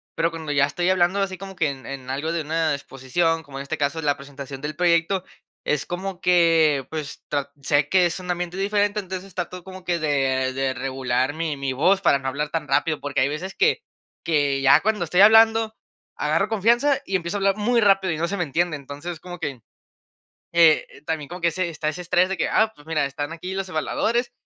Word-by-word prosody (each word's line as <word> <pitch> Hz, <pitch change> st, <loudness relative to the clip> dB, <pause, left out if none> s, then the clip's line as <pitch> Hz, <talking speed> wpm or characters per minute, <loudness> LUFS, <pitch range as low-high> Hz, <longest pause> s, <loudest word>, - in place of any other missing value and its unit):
pero 165 Hz, -, +1 dB
cuando 160 Hz, -3 st, -4 dB
ya 145 Hz, 0 st, +4 dB
estoy 175 Hz, +5 st, -1 dB
hablando 185 Hz, +1 st, +2 dB
así 195 Hz, -1 st, -1 dB
como 195 Hz, +1 st, -9 dB
que 155 Hz, -4 st, +2 dB
en 135 Hz, -3 st, -11 dB
en 135 Hz, -1 st, -7 dB
algo 145 Hz, +5 st, -2 dB
de 170 Hz, -, -1 dB
una 160 Hz, +1 st, 0 dB
exposición, 150 Hz, +5 st, -1 dB
como 140 Hz, -2 st, -10 dB
en -, -, -4 dB
este 160 Hz, +3 st, -4 dB
caso 145 Hz, +3 st, -1 dB
la 145 Hz, -2 st, +1 dB
presentación 140 Hz, -1 st, -9 dB
del 150 Hz, +1 st, -5 dB
proyecto, 175 Hz, +2 st, +2 dB, 0.4 s
es 150 Hz, -2 st, 0 dB
como 185 Hz, +1 st, -5 dB
que 165 Hz, -6 st, +3 dB
pues, 155 Hz, -3 st, -6 dB
tra 140 Hz, -1 st, -2 dB
sé 145 Hz, +1 st, +2 dB
que 185 Hz, -2 st, +4 dB
es 170 Hz, -, -1 dB
un 180 Hz, 0 st, -3 dB
ambiente 175 Hz, 0 st, -3 dB
diferente. 205 Hz, +1 st, 0 dB
Entonces, 190 Hz, -1 st, -8 dB
trato 180 Hz, 0 st, -4 dB
como 190 Hz, -1 st, -10 dB
que 175 Hz, -1 st, -1 dB
de 135 Hz, -4 st, 0 dB
de 135 Hz, 0 st, -1 dB
regular 130 Hz, +1 st, -1 dB
mi 160 Hz, -2 st, -3 dB
mi 135 Hz, -1 st, -2 dB
voz 180 Hz, +9 st, +3 dB
para 175 Hz, -7 st, +3 dB
no 135 Hz, -1 st, -3 dB
hablar 145 Hz, +3 st, -2 dB
tan 160 Hz, -1 st, -2 dB
rápido, 150 Hz, +3 st, 0 dB
porque 145 Hz, -, -2 dB
hay 130 Hz, -, +3 dB
veces 170 Hz, +7 st, -5 dB
que 450 Hz, 0 st, +2 dB, 0.4 s
que 145 Hz, -4 st, +1 dB
ya 135 Hz, 0 st, +6 dB
cuando 215 Hz, -2 st, 0 dB
estoy 175 Hz, +2 st, 0 dB
hablando, 225 Hz, +1 st, +6 dB, 0.4 s
agarro 155 Hz, +6 st, +1 dB
confianza 235 Hz, +6 st, +2 dB
y 195 Hz, -, 0 dB
empiezo 170 Hz, +2 st, -4 dB
a -, -, -1 dB
hablar 195 Hz, 0 st, +2 dB
muy 235 Hz, +3 st, +2 dB
rápido 195 Hz, -3 st, +3 dB
y -, -, -4 dB
no 165 Hz, -, 0 dB
se 200 Hz, -, -2 dB
me 180 Hz, -, 0 dB
entiende, 165 Hz, +2 st, 0 dB
entonces, 145 Hz, +4 st, -7 dB
como 175 Hz, +1 st, -9 dB
que, 140 Hz, -7 st, -5 dB, 0.9 s
eh, 165 Hz, -4 st, +4 dB
también 155 Hz, -3 st, -2 dB
como 180 Hz, +3 st, -8 dB
que 170 Hz, -, +3 dB
ese 185 Hz, +2 st, -2 dB
está 155 Hz, -2 st, -2 dB
ese 175 Hz, +3 st, -5 dB
estrés 180 Hz, +1 st, +2 dB
de 190 Hz, -, -2 dB
que: 165 Hz, -, 0 dB
"Ah, 220 Hz, 0 st, +3 dB
pues 145 Hz, -, -18 dB
mira, 155 Hz, -2 st, 0 dB
están 145 Hz, +3 st, -4 dB
aquí 180 Hz, +3 st, -6 dB
los 195 Hz, 0 st, -3 dB
evaluadores 235 Hz, +9 st, -1 dB
165 Hz, 220 wpm, -23 LUFS, 145-185 Hz, 0.9 s, ya